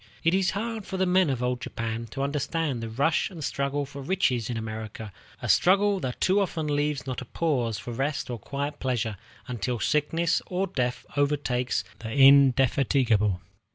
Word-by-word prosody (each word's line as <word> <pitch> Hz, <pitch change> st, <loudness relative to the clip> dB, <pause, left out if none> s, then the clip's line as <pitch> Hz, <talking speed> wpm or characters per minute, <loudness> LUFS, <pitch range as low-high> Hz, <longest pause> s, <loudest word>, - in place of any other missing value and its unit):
It 165 Hz, -, +3 dB
is 190 Hz, -1 st, +3 dB
hard 225 Hz, 0 st, -3 dB
for 190 Hz, -, -4 dB
the 190 Hz, -, +2 dB
men 185 Hz, -2 st, +3 dB
of 125 Hz, -2 st, -1 dB
old 125 Hz, 0 st, -1 dB
Japan 115 Hz, 0 st, -4 dB
to 135 Hz, +5 st, -4 dB
understand 145 Hz, -1 st, -1 dB
the 115 Hz, -, -4 dB
rush 140 Hz, -, +1 dB
and 170 Hz, -6 st, -8 dB
struggle 140 Hz, +1 st, -1 dB
for 140 Hz, 0 st, -9 dB
riches 130 Hz, -, 0 dB
in 120 Hz, -, -2 dB
America, 110 Hz, -1 st, -6 dB, 0.3 s
a -, -, -2 dB
struggle 200 Hz, +2 st, +4 dB
that 130 Hz, -5 st, -4 dB
too 190 Hz, +2 st, +3 dB
often 170 Hz, -5 st, -1 dB
leaves 145 Hz, -1 st, 0 dB
not 130 Hz, -1 st, -4 dB
a -, -, -7 dB
pause 125 Hz, -7 st, -1 dB
for 120 Hz, -, -7 dB
rest 140 Hz, +4 st, -2 dB
or 120 Hz, -, -4 dB
quiet 140 Hz, +5 st, -4 dB
pleasure 120 Hz, -4 st, -1 dB, 0.3 s
until 120 Hz, -1 st, -2 dB
sickness 165 Hz, +7 st, +1 dB
or 185 Hz, +1 st, 0 dB
death 125 Hz, -9 st, -2 dB
overtakes 140 Hz, -4 st, 0 dB, 0.2 s
the 110 Hz, -1 st, -6 dB
indefatigable 135 Hz, -4 st, +5 dB
worker. 90 Hz, -, -8 dB
140 Hz, 180 wpm, -27 LUFS, 120-160 Hz, 0.3 s, indefatigable